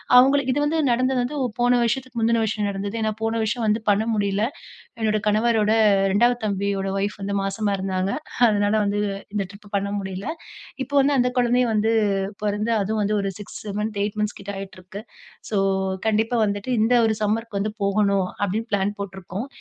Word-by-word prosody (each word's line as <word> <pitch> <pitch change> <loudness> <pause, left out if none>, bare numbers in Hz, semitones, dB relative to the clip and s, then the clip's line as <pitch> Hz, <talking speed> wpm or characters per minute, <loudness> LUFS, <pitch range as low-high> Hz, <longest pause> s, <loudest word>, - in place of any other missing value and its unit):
அவுங்களுக்கு 265 +1 +5
இது 290 - 0
வந்து 315 +2 0
நடந்தது 255 +1 +2
வந்து 260 +5 -3 0.2
போன 245 0 +4
வருஷத்துக்கு 250 +1 -2
முந்தின 230 +1 +2
வருஷம் 215 -1 -1
நடந்தது. 200 +2 -4
ஏன்னா 220 0 +1
போன 225 0 0
வருஷம் 220 +2 -1
வந்து 215 +1 +2
பண்ண 205 +1 +3
முடியல. 200 -1 0 0.6
என்னோட 215 -1 +1
கணவரோட 215 0 +3 0.4
2வது 240 +5 +3
தம்பியோட 200 -1 -1
வைஃப் 200 +1 -2
வந்து 200 +1 -2
மாசமா 200 +1 -1
இருந்தாங்க. 190 0 -1 0.4
அதனால 205 0 +2
வந்து 205 +1 0 0.3
இந்த 200 -1 0
ட்ரிப் 200 0 -14
பண்ண 200 0 -1
முடியல. 190 +2 -5 0.6
இப்போ 285 +3 -9
வந்து 280 +1 +3
அந்த 250 0 +3
கொழந்தை 245 +1 +3
வந்து 220 +1 +2 0.5
பொறந்து 210 +2 0
அதுவும் 215 +2 0
வந்து 210 +1 +1
ஒரு 195 - -1
6 205 - -8 0.2
மந்த் 210 -1 -2
8 210 +1 -4
மந்த்ஸ் 210 0 -2
கிட்ட 200 0 -6
ஆயிட்டுருக்கு. 190 +1 -9 0.5
ஸோ 210 - +1 0.5
கண்டிப்பா 220 +2 +1
வந்துட்டு 205 +4 -3
இந்த 225 +3 +3
ஒரு 220 - +1
சம்மர்க்கு 215 0 -1
வந்து 210 +1 -1
போகணும், 200 -1 +2 0.2
அப்டீன்னு 220 +4 -2
ப்ளான் 200 +1 0
போட்டிருக்கோம். 195 +3 -5
210 Hz, 170 wpm, -23 LUFS, 200-230 Hz, 0.6 s, அவுங்களுக்கு